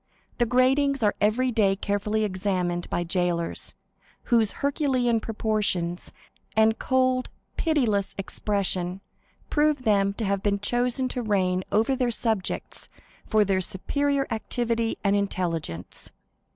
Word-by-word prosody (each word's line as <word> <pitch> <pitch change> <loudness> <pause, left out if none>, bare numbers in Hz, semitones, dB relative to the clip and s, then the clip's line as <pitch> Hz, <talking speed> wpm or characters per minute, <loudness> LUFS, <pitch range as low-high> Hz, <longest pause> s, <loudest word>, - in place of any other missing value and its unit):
The 240 - +3
gratings 265 +2 +3
are 205 - +3
every 240 +5 +2
day 205 -4 +3
carefully 205 +2 -1
examined 185 -3 -1
by 175 - -1
jailers, 175 -1 -1 0.5
whose 230 -4 +2
herculean 260 -5 +1
proportions 210 -6 -1 0.4
and 220 0 +4
cold 255 -1 +1 0.3
pitiless 230 - +1
expression 195 -2 -1 0.5
prove 295 -3 +2
them 200 -3 +3
to 220 +2 -3
have 200 0 0
been 200 0 0
chosen 245 +4 +1
to 250 - -3
reign 185 -4 +1
over 225 +5 +2
their 250 -2 +1
subjects 220 -4 -2 0.4
for 215 -1 +3
their 190 -1 +1
superior 280 +10 0
activity 230 0 -1
and 200 0 +3
intelligence. 165 - -3
215 Hz, 120 wpm, -26 LUFS, 195-245 Hz, 0.5 s, and